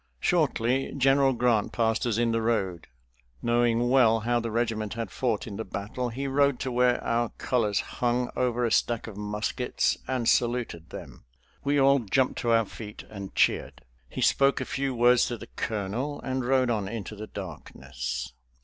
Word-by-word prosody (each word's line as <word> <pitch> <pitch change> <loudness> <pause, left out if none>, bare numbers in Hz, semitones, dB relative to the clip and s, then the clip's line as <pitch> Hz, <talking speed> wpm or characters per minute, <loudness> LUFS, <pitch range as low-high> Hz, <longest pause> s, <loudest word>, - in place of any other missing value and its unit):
Shortly 135 - +1
General 135 0 +4
Grant 120 -3 +1
passed 115 +1 0
us 115 -2 0
in 120 -1 +2
the 115 0 0
road. 100 -7 -1 0.6
Knowing 120 0 +2
well 115 -4 +5
how 120 +2 +1
the 115 0 -3
regiment 110 -2 -1
had 115 -5 -4
fought 115 -3 -1
in 100 -3 -7
the 110 - -3
battle, 105 +5 -4
he 130 +4 -4
rode 140 -1 +2
to 130 - -2
where 125 0 +3
our 115 0 0
colors 110 -5 +1
hung 120 0 -1
over 125 -1 +1
a 115 - 0
stack 120 -2 +1
of 110 - -8
muskets 105 +4 -1
and 125 -3 -1
saluted 120 -10 0
them. - - -10 0.4
We 145 +1 +1
all 140 +1 +5
jumped 125 +3 0
to 120 - -1
our 115 -1 +4
feet 105 +1 -9
and 100 -2 -8
cheered. 65 -2 +1 0.3
He - - -5
spoke 140 0 +3
a - - -3
few 135 -1 -2
words 120 +1 +5
to 120 - -4
the - - -11
colonel 115 +7 -3
and 130 0 -2
rode 130 -1 +2
on 105 -4 -1
into 110 0 -6
the 110 +1 -7
darkness. - - -6
120 Hz, 175 wpm, -27 LUFS, 110-125 Hz, 0.6 s, well